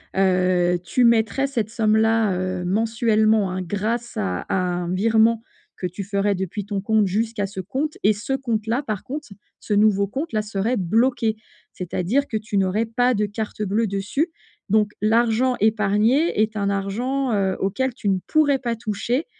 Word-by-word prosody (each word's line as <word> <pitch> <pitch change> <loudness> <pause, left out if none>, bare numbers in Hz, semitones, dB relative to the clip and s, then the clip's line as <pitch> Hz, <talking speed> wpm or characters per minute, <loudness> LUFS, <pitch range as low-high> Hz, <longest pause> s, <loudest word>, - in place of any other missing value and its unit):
heu, 180 -2 +2
tu 250 - +1
mettrais 235 +3 +3
cette 230 -6 -2
somme-là, 220 -1 +2
heu, 185 0 -2
mensuellement 220 0 +2
hein 185 +1 -3
grâce 215 +6 -3
à 90 -2 -2
à - - -1
un 180 -1 -1
virement 225 +3 +3 0.3
que - - -5
tu 185 +2 -5
ferais 200 0 0
depuis 190 +2 -4
ton 200 -1 -3
compte 215 +1 +2
jusqu'à 215 +2 -1
ce 195 0 -7
compte 270 - -3
et 210 - +5
ce 210 +6 -7
compte-là 235 -1 -1
par 215 -7 -4
contre, 290 +3 -6 0.3
ce 210 - -3
nouveau 205 -1 +3
compte-là 265 - -2
serait 210 +4 -1
bloqué. 225 +4 +1 0.4
C'est-à-dire 185 +10 -1
que 220 - -1
tu 215 -1 -3
n'aurais 195 +4 +1
pas 245 +2 +1
de 210 -1 +1
carte 215 +1 -4
bleue 210 +3 0
dessus 200 - -1 0.4
donc 210 0 +2
l'argent 235 +3 +2
épargné 215 - +2
est 215 0 0
un 200 -1 0
argent, 235 +7 -1
heu, 190 -2 0
auquel 250 +6 -1
tu 235 - -6
ne 190 -2 +2
pourrais 290 -3 +3
pas 235 -3 -2
toucher 225 +6 -2
215 Hz, 165 wpm, -22 LUFS, 195-235 Hz, 0.4 s, et